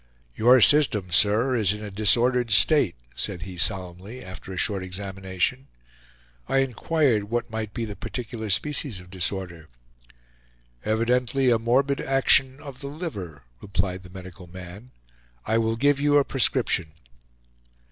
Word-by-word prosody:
"Your 125 +3 +5
system, 130 - +4
sir, 110 +9 +3
is 105 -4 +2
in 105 +1 -8
a 105 - -7
disordered 120 +4 +2
state," 115 - +4 0.2
said 85 +6 -3
he 95 0 -8
solemnly, 95 +6 -3
after 95 +1 -10
a 95 - -6
short 100 +1 0
examination. 95 +6 -3 0.8
I - - +2
inquired 135 -2 +1
what 120 +2 -3
might 110 -1 -4
be 115 0 -4
the 105 -2 -7
particular 110 +1 -6
species 135 0 0
of 90 0 -15
disorder. 90 -3 -4 1.1
"Evidently 125 +4 +1
a 115 - +3
morbid 135 +5 +1
action 135 0 +3
of 140 -4 -10
the 140 - -7
liver," 100 - -7 0.2
replied 95 -1 -2
the 90 - -14
medical 90 -1 -11
man; 90 +6 -11 0.6
"I 115 - +1
will 115 0 0
give 140 +4 +2
you 145 0 +3
a 140 - +3
prescription." 120 - 0
110 Hz, 140 wpm, -25 LUFS, 95-130 Hz, 1.1 s, Your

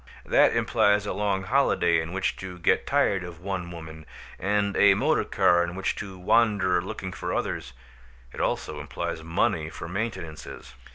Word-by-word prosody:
That - - +4
implies 105 0 +2
a - - -2
long 100 -1 -1
holiday 95 -8 +2
in 80 +1 -6
which 95 +1 -1
to 95 -1 -7
get 85 - +1
tired 95 -2 +2
of 85 -2 -9
one 90 -1 -4
woman, 80 -2 -10 0.3
and 100 +1 0
a 100 -1 +6
motor - - +2
car 85 0 +3
in 85 +1 -4
which 95 0 -1
to 95 -2 -7
wander 95 -2 +2
looking 95 0 -6
for - - -4
others; 70 -6 -3 0.6
it - - -5
also - - -2
implies - - -4
money 80 0 0
for 80 - -8
maintenances. 85 - -6
95 Hz, 165 wpm, -26 LUFS, 85-100 Hz, 0.6 s, a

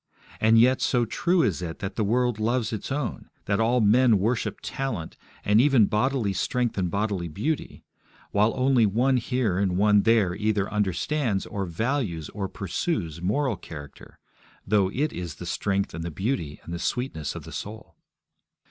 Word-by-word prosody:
And 110 +1 +5
yet 130 +3 +4
so 120 -3 +2
true 175 - +1
is 95 -3 0
it 80 -2 -5
that 95 0 -5
the 110 - 0
world 120 +1 +1
loves 115 0 0
its 110 - -5
own, 140 -3 -3 0.2
that 100 +1 0
all 120 +2 +3
men 115 +2 +5
worship 110 +4 -1
talent, 110 -12 -4 0.3
and 105 +2 +5
even 135 -5 +5
bodily 110 -1 0
strength 120 +6 -1
and 90 -3 0
bodily 100 -2 -1
beauty, 115 - -3 0.5
while 105 +2 +3
only 130 -3 +3
one 125 +6 +2
here 120 -6 0
and 95 -3 +1
one 105 +1 +5
there 110 -5 +3
either 105 0 0
understands 105 - 0
or 100 -2 -4
values 95 - -2
or 100 -2 -4
pursues 95 - -3
moral 115 +5 0
character, 75 -4 -11 0.5
though 100 -3 +2
it 145 +6 -1
is 85 -4 -5
the 90 - -8
strength 100 +3 -1
and 80 +1 -5
the 85 - -3
beauty 85 - -3
and 85 - -7
the 85 - -4
sweetness 80 - -3
of - - -7
the - - -10
soul. 110 +1 -8
105 Hz, 170 wpm, -26 LUFS, 95-125 Hz, 0.5 s, And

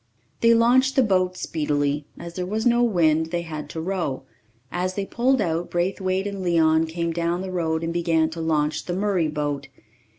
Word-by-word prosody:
They 230 0 +5
launched 255 +3 +4
the 265 - +5
boat 185 -4 +1
speedily; 145 -1 -1
as 170 0 -8
there 180 - -3
was 215 +4 -2
no 240 0 +4
wind, 160 -8 +3
they 170 +1 -2
had 155 -2 -6
to 160 - -6
row. 165 -6 -2 0.5
As 185 +1 -2
they 200 - -2
pulled 255 +5 +1
out, 170 -2 -1
Braithwaite 185 +2 -1
and 200 -1 -4
Leon 165 -2 +3
came 170 +1 -2
down 170 +1 -1
the 190 - -5
road 160 -2 -1
and 165 0 -2
began 165 -2 +1
to 165 0 -5
launch 155 -2 0
the 175 - -3
Murray 190 -4 +1
boat. 145 -2 -3
170 Hz, 190 wpm, -24 LUFS, 160-190 Hz, 0.5 s, They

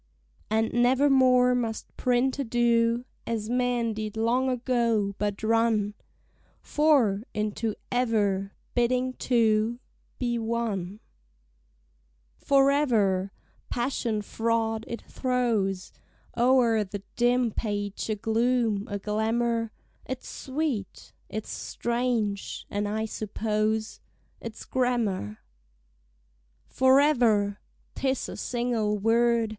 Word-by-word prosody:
And 220 +1 +1
nevermore 255 0 +4
must 230 -3 -3
printer 255 +3 +1
do 235 0 +2 0.2
As 225 -1 -2
men 245 -2 +1
did 215 0 -5
long 245 +4 +2
ago; 235 -5 +1
but 205 0 -2
run 225 -2 +2 0.7
"For" 275 -10 +2
into 215 +1 -2 0.2
"ever," 205 -5 0 0.2
bidding 250 +1 +1
two 230 -2 +1 0.4
Be 240 -2 -1
one. 220 -4 -3 1.4
Forever! 245 -9 +3 0.4
passion 235 -3 -1
fraught, 225 0 -1
it 235 - -6
throws 230 -7 -1 0.4
O'er 240 -3 +4
the 200 0 -7
dim 245 0 +2
page 205 -1 -3
a 215 - +1
gloom, 225 -1 +1
a 205 - -2
glamour: 225 +2 0 0.4
It's 260 -1 -5
sweet, 265 - -4 0.2
it's 215 0 -5
strange; 235 -4 -2
and 205 0 -1
I 220 +1 -1
suppose 215 0 -2 0.4
It's 225 -1 -8
grammar. 225 - -1 1.2
Forever! 250 -7 +3 0.3
'Tis 265 -1 -1
a - - -6
single 235 -4 -1
word! 230 +1 +2
230 Hz, 95 wpm, -27 LUFS, 215-245 Hz, 1.4 s, nevermore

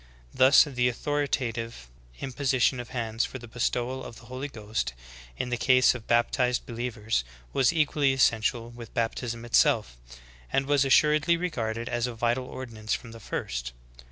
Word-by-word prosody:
Thus, 130 +2 +7
the 125 -4 0
authoritative 120 - -2 0.3
im 135 -2 -5
position 130 -2 +2
of 120 0 -7
hands 115 -2 -2
for - - -4
the 120 -1 -11
bestowal 120 +3 -2
of 120 - -9
the 115 - -14
Holy 130 +4 -5
Ghost 105 - -4 0.4
in 125 - -2
the 120 - -1
case 130 -1 +5
of 120 -3 -9
baptized 125 +1 +2
believers 115 - -2 0.3
was 130 -2 +4
equally 150 -3 +2
essential 120 -2 +1
with 120 -2 -11
bap 115 -1 +1
tism 120 -1 -5
itself/ 60 - +3 0.6
and 135 - +1
was 140 -1 +3
assuredly 150 +4 +4
regarded 115 -10 -3
as 120 0 -1
a 120 - -6
vital 120 +3 0
ordinance 115 -5 -4
from 115 - -9
the 115 - -11
first. - - -4
120 Hz, 160 wpm, -27 LUFS, 115-130 Hz, 0.6 s, Thus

